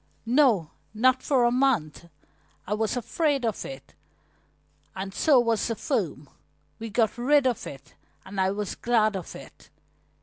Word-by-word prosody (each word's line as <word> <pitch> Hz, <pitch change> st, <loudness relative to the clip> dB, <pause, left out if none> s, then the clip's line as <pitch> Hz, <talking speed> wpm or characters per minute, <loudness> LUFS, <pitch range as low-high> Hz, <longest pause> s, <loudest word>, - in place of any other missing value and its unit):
"No, 235 Hz, -, +3 dB, 0.2 s
not 255 Hz, +4 st, +3 dB
for 265 Hz, -4 st, +2 dB
a 240 Hz, -, +3 dB
month. 230 Hz, -, 0 dB, 0.6 s
I 205 Hz, -, -2 dB
was 220 Hz, +3 st, -1 dB
afraid 275 Hz, +3 st, 0 dB
of 220 Hz, -3 st, -2 dB
it, 135 Hz, 0 st, -10 dB, 1.0 s
and 190 Hz, 0 st, -5 dB
so 280 Hz, +3 st, +4 dB
was 230 Hz, -3 st, +1 dB
the 230 Hz, -, -2 dB
firm. 180 Hz, -, -2 dB, 0.5 s
We 225 Hz, 0 st, -6 dB
got 225 Hz, +1 st, 0 dB
rid 280 Hz, +3 st, +3 dB
of 250 Hz, -4 st, -1 dB
it, 140 Hz, +1 st, -11 dB, 0.3 s
and 195 Hz, -1 st, -3 dB
I 190 Hz, -, +2 dB
was 200 Hz, 0 st, -3 dB
glad 220 Hz, -3 st, +1 dB
of 185 Hz, -3 st, -6 dB
it." -, -, -13 dB
225 Hz, 155 wpm, -26 LUFS, 195-255 Hz, 1.0 s, so